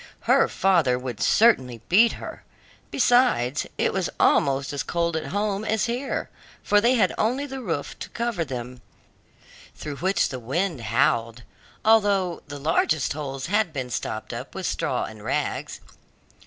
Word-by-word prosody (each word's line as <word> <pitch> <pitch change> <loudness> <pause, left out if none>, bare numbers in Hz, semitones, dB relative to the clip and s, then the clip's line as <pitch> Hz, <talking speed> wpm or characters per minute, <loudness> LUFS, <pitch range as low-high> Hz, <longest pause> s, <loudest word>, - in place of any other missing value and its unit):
Her - - +4
father 170 -10 +2
would 125 -4 -6
certainly 130 - +3
beat 225 +6 +5
her; - - -9 0.5
besides, 245 - +2
it - - +1
was 190 -2 -1
almost 140 0 +2
as 140 - -2
cold 170 -1 -1
at 160 - -3
home 205 +1 -1
as 220 0 0
here, 250 +3 -2 0.4
for 205 0 +3
they 240 +4 +4
had 230 - +2
only 255 +6 +1
the 270 -1 -6
roof 165 - -4
to - - -7
cover 235 -7 -2
them, 125 -3 -7 0.9
through 145 -2 -6
which 190 +7 +1
the 130 - -5
wind 155 +5 -2
howled, 115 +1 +1 0.4
although 200 -5 +3
the 145 0 -7
largest 155 0 +1
holes 135 -3 -5
had 205 0 +1
been 130 -4 -5
stopped 110 -1 -4
up - - -7
with - - -4
straw - - -1
and - - -8
rags. - - -2
165 Hz, 155 wpm, -24 LUFS, 130-215 Hz, 0.9 s, beat